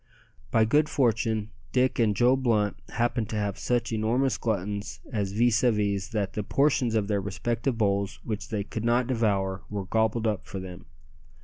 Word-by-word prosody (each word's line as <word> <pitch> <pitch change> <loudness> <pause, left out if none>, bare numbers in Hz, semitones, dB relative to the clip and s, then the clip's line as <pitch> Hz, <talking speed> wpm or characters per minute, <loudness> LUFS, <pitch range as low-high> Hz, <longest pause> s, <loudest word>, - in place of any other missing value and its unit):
By 110 +5 +4
good 150 +7 +3
fortune 110 -5 +1 0.2
Dick 130 0 +2
and 110 -3 +3
Joe 120 +5 +4
Blunt 115 -6 +1
happened 120 -2 -1
to 110 - -4
have 105 -2 -2
such 120 -1 0
enormous 120 +5 +1
gluttons 100 -5 -2
as 100 -3 -1
vis 115 +1 +3
à 125 - +4
vis 100 -2 0
that 105 -3 -2
the 105 - -2
portions 130 0 +2
of 105 -2 +1
their 100 -2 0
respective 115 +5 -2
bowls 100 -2 0
which 110 -2 -4
they 105 -2 -1
could 110 +2 -5
not 120 +2 +2
devour 100 -6 0
were 100 -2 -4
gobbled 110 +2 +1
up 105 -3 -1
for 95 - -5
them. 90 -1 -9
110 Hz, 180 wpm, -27 LUFS, 100-120 Hz, 0.2 s, By